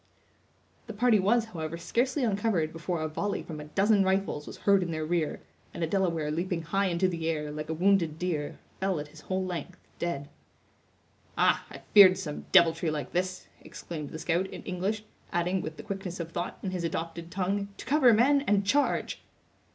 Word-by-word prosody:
The 225 - -6
party 225 -1 +4
was, 225 +4 +3
however, 160 0 -4
scarcely 255 - 0
uncovered 200 -7 +1
before 165 0 -3
a - - 0
volley 200 +6 -2
from 155 -2 -7
a 150 - -7
dozen 195 +6 +3
rifles 190 -5 0
was - - -8
heard 200 -1 +5
in 175 - -2
their 155 -1 -2
rear; 165 -1 -1 0.3
and 170 - -2
a - - +1
Delaware 165 -4 0
leaping 170 +1 -2
high 195 +4 +1
in 175 -2 -1
to 185 - +3
the 165 -2 -2
air, 150 -2 -2
like 150 +1 -6
a 160 - -1
wounded 175 -3 +2
deer, 165 -4 -2 0.2
fell 190 -4 0
at 150 0 -6
his 155 +1 -14
whole 185 0 -2
length, 180 0 -5 0.2
dead. 145 -5 -2 1.1
"Ah, - - +3
I - - -10
feared 190 -3 +9
some 150 -6 -6
deviltry 165 0 +5
like 150 -2 -3
this!" 185 +1 -2 0.2
exclaimed 155 -4 -7
the - - -7
scout, 175 +3 0
in - - -9
English, 195 +4 -2 0.3
adding, 180 +1 0
with 155 0 -6
the - - -8
quickness 195 -3 -5
of 165 -1 -5
thought, 175 +1 -4
in 190 - -2
his 180 -2 -3
adopted 165 0 -4
tongue: 195 +2 -1
"To - - -9
cover, 265 -2 +5
men, 265 +6 +4
and 200 -1 +3
charge!" 285 +8 +1
180 Hz, 195 wpm, -29 LUFS, 160-195 Hz, 1.1 s, feared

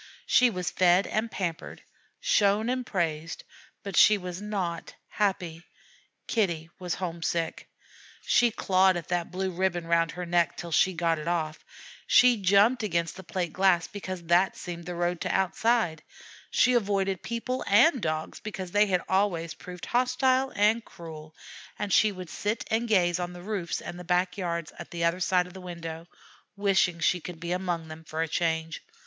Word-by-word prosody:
She 250 -1 +5
was 180 -5 -3
fed 180 +1 +4
and 220 +2 -1
pampered, 175 -5 -5 0.4
shown 215 - +2
and 255 0 -1
praised; 165 -6 -3 0.4
but 200 -3 -5
she 210 +4 +7
was 180 -1 -6
not 190 -5 -4
happy. 180 -5 -1 0.6
Kitty 170 -7 -1
was 180 -2 -3
homesick! 170 -2 -3 0.6
She 240 -1 +4
clawed 190 -3 +3
at 170 - -7
that 175 -1 -1
blue 190 +1 -2
ribbon 175 -1 -1
round 165 0 +2
her 180 0 -5
neck 175 0 +1
till 170 -1 -6
she 185 +4 +3
got 165 -1 0
it 155 - -7
off; 160 -3 -2 0.4
she 245 -1 +6
jumped 205 +6 +4
against 170 -5 -1
the 190 - -9
plate 175 -2 -3
glass 185 -2 +3
because 185 -3 -7
that 175 +3 +2
seemed 170 -1 -7
the 180 - -4
road 175 0 -1
to - - -2
outside; 190 -3 +1 0.5
she 250 - +3
avoided 195 -4 0
people 235 +2 -3
and 245 +6 +5
Dogs 155 -2 -3
because 190 -4 -6
they 210 +2 +4
had 180 -2 +1
always 180 -4 0
proved 180 -1 -9
hostile 255 +2 +2
and 215 +3 +3
cruel; 160 -5 -11 0.4
and 205 -2 -2
she 215 - +5
would 185 -4 -9
sit 210 +3 -2
and 230 +2 +1
gaze 180 -5 +2
on 180 0 -4
the 175 0 -10
roofs 195 -4 -3
and 175 +1 -7
back 180 +1 +1
yards 170 -4 -3
at - - -8
the 170 -1 -4
other 170 +2 +1
side 180 0 +2
of 180 - -13
the 190 - -10
window, 170 -2 -7 0.5
wishing 195 -4 +2
she 180 +2 +2
could 175 -1 -8
be 170 +1 -5
among 175 -3 -2
them 160 0 -10
for 160 +1 -3
a - - -3
change. 160 0 -1
180 Hz, 175 wpm, -27 LUFS, 170-205 Hz, 0.6 s, she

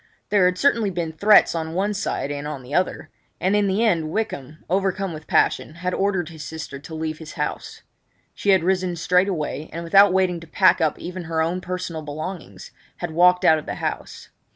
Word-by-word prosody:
There 200 -3 +4
had 180 0 +2
certainly 235 -6 +2
been 170 -3 -3
threats 205 +6 +5
on 160 -1 -4
one 200 +3 0
side 195 -7 -2
and 145 0 -4
on 145 -3 -6
the 125 +3 -10
other; 180 +3 -1 0.3
and 190 +3 +1
in 205 -1 +2
the 200 +4 +1
end 165 -8 +1
Wykham, 155 -7 -4
overcome 190 0 -1
with 155 0 -10
passion, 155 - +1
had 180 +2 -3
ordered 190 -4 0
his 160 -2 -9
sister 155 -2 -7
to 160 +3 -9
leave 155 -1 -4
his 160 -1 -9
house. - - -5 0.5
She 205 - -3
had 190 -4 +5
risen 185 -1 0
straightway, 170 -3 0
and, 170 +2 -5
without 195 +4 +6
waiting 185 -2 +1
to 165 - -13
pack 185 +1 +3
up 155 -2 +1
even 180 0 -7
her 160 0 -2
own 175 +3 -2
personal 180 -3 -4
belongings, 155 +4 -7 0.3
had 175 -2 -4
walked 180 +2 +4
out 160 - +6
of 150 - -12
the - - -3
house. - - -5
175 Hz, 200 wpm, -22 LUFS, 160-190 Hz, 0.5 s, without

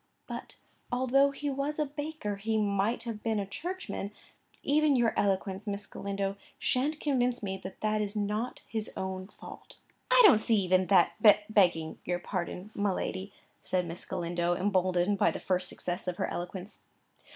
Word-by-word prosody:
"But, - - -7 0.3
although 260 +3 +4
he 285 +1 -3
was 275 +2 -2
a 305 - +1
baker, 290 -7 -4
he 220 +2 -1
might 205 +2 +1
have 230 -3 -5
been 220 -1 0
a 200 - -1
Churchman. 340 - -4 0.5
Even 300 0 +3
your 235 -3 +3
eloquence, 195 +1 0
Miss 200 0 -3
Galindo, 195 0 -3 0.2
shan't 290 +5 0
convince 250 -4 +1
me 190 -1 -3
that 190 0 -8
that 215 0 +1
is 205 0 -3
not 210 +3 -2
his 220 -1 -3
own 190 0 -4
fault." - - -12 0.3
"I - - +6
don't 305 - +7
see 225 - +3
even 185 -2 +3
that, 190 -4 +5 0.4
begging 175 -6 +3
your 175 - -1
pardon, 180 +2 -4
my 200 -1 +1
lady," 190 +1 -3 0.3
said 180 -1 0
Miss 170 +1 -6
Galindo, 175 0 -1
emboldened 185 0 +1
by - - +5
the - - -4
first 180 -1 +1
success 180 +1 -4
of 180 -1 -2
her - - 0
eloquence. 180 +3 -6
205 Hz, 165 wpm, -30 LUFS, 185-245 Hz, 0.5 s, don't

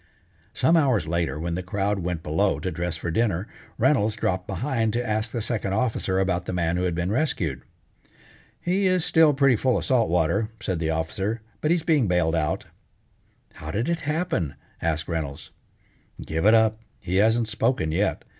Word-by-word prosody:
Some 165 - +3
hours 130 - +2
later 85 -2 -1
when 85 +1 -2
the 90 - -2
crowd 100 +2 -1
went 85 -2 -3
below 95 +7 +1
to 95 - -3
dress 85 0 -3
for 85 - -4
dinner, 100 -1 0 0.3
Reynolds 120 -4 +2
dropped 95 -4 -1
behind 115 +1 -1
to 120 0 -1
ask 110 +1 -1
the 115 -1 -3
Second 105 -4 -1
Officer 110 -5 0
about 90 -2 0
the - - -4
man 85 -1 0
who 90 +1 0
had 90 -2 -1
been 90 +3 -1
rescued. 105 - -1 1.0
"He 190 +3 +1
is 185 -2 +2
still 160 -2 +5
pretty 140 -2 +4
full 125 +3 +1
of - - -3
salt 125 -4 +2
water," 90 +6 +1
said 90 -4 -2
the 80 -1 -1
Officer, 95 +8 -2 0.2
"but 155 - 0
he 170 - +5
is 165 - -5
being 150 -9 +3
bailed 90 -3 +2
out." 80 -2 -1 0.9
"How 75 - -9
did 110 +9 -1
it 170 -1 -1
happen?" 150 - -1 0.3
asked 80 -1 -1
Reynolds. 80 -5 -4 0.7
"Give 80 +5 0
it 110 - +7
up. 110 -1 +3 0.2
He 90 +1 -2
hasn't 110 +3 +3
spoken 110 -6 0
yet. 95 +4 0
100 Hz, 185 wpm, -25 LUFS, 85-120 Hz, 1.0 s, it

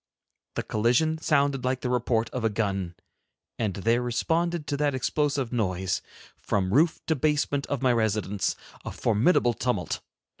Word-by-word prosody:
The - - -1
collision 125 +9 +1
sounded 140 -4 +1
like 130 0 0
the 125 - -2
report 120 -2 +1
of 125 - -3
a 115 - +3
gun, 95 -4 -2 0.6
and 105 -5 -1
there 115 +5 +1
responded 165 +7 0
to 145 +1 -2
that 145 -2 +1
explosive 140 -1 0
noise, 95 -5 0 0.4
from 95 -1 -1
roof 160 +6 +3
to 160 - +1
basement 145 -1 0
of 140 -2 -2
my 125 -1 +4
residence, 105 -3 0 0.3
a - - -5
formidable 120 - +2
tumult. 105 -10 -1
125 Hz, 150 wpm, -27 LUFS, 110-145 Hz, 0.6 s, my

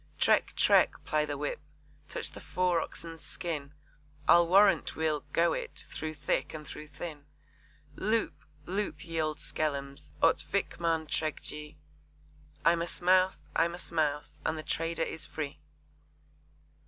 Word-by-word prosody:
'Trek,' - - +3
'trek,' - - +5
ply 155 0 +2
the 145 -1 -3
whip - - -2 0.5
touch - - -2
the - - -9
fore 180 -2 +1
oxen's 165 0 -4
skin, 150 -5 -3 0.6
I'll 170 0 +7
warrant 195 +4 +5
we'll 155 -2 +1
'go 170 0 +3
it' - - -4
through 155 0 -4
thick 150 +1 -1
and 150 -1 -7
through 150 - -8
thin 150 -1 -8 0.7
Loop! 220 +3 +1 0.3
loop 200 +2 -3
ye 165 -1 -1
oud 155 -1 -1
skellums! 140 -3 -3
ot - - +5
Vikmaan 165 -2 0
trek 155 0 -2
jy; 150 0 -6 0.9
I'm 170 0 +5
a 170 - -1
Smouse, 185 -3 +2
I'm 170 +1 +2
a - - -8
Smouse, 150 -3 -1
and 160 - 0
the 155 - -5
trader 165 +2 -1
is 160 - -4
free! 150 -2 -5
160 Hz, 140 wpm, -31 LUFS, 150-170 Hz, 0.9 s, I'll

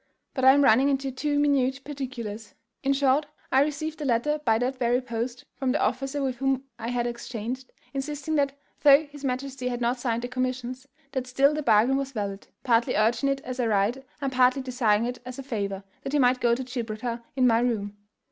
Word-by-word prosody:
But 260 - -3
I 265 - +9
am 285 +1 +4
running 265 +3 +5
into 270 -1 0
too 290 +3 -1
minute 275 -2 +2
particulars. 245 -7 -6 0.3
In 275 -2 +1
short, 275 +1 +2 0.2
I 265 - +5
received 305 +2 -2
a - - -2
letter 270 +5 +1
by 225 -4 +3
that 255 +3 -1
very 245 0 +2
post 245 0 -4
from 265 -2 -1
the 295 - +1
officer 270 +4 -1
with 260 -2 -1
whom 270 0 0 0.2
I 225 - -4
had 240 0 -1
exchanged, 240 +1 -5 0.2
insisting 290 +2 -3
that, 280 -2 +1 0.2
though 285 0 +7
his 290 -1 -13
majesty 260 0 -3
had 245 -1 -2
not 245 +1 0
signed 235 -1 -1
the - - -2
commissions, 255 +1 -3 0.2
that 260 -2 -3
still 275 +3 +3
the 305 - -2
bargain 235 +1 +4
was 275 0 -3
valid, 200 -3 -4 0.2
partly 240 0 +2
urging 230 +6 +2
it 275 0 -1
as 255 0 -6
a 240 - +2
right, 215 +5 +1 0.2
and 275 -1 -2
partly 255 +1 +3
desiring 235 -4 +2
it 245 +1 -4
as 255 0 -8
a 275 - -6
favour, 200 -6 -3 0.2
that 275 - -5
he - - +4
might 255 -1 +3
go 235 -1 +4
to 260 - -4
Gibraltar 235 -1 -4
in 260 -2 +3
my 230 -2 +5
room. 215 -4 -1
255 Hz, 210 wpm, -26 LUFS, 235-275 Hz, 0.3 s, I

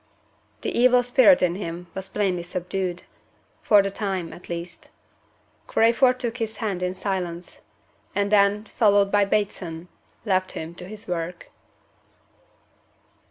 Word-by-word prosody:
The - - -3
evil 250 0 +5
spirit 260 0 +5
in 175 -1 +2
him 175 -2 -6
was 190 0 -6
plainly 190 -4 0
subdued 180 +1 -4 0.6
for 205 -2 +5
the 195 - -2
time, 190 -4 -3
at 175 - -13
least. 170 0 -6 0.8
Crayford 250 +3 +3
took 240 -1 -3
his 225 -2 -4
hand 200 -5 -3
in 180 0 -2
silence; 180 -3 -4 0.6
and 200 0 0
then 205 0 +4
(followed 205 -3 +3
by 205 -1 +4
Bateson) 180 -5 -2 0.4
left 185 -2 0
him 160 +1 -6
to 180 - -9
his 215 +2 -9
work. 175 0 -5
195 Hz, 130 wpm, -24 LUFS, 180-215 Hz, 0.8 s, evil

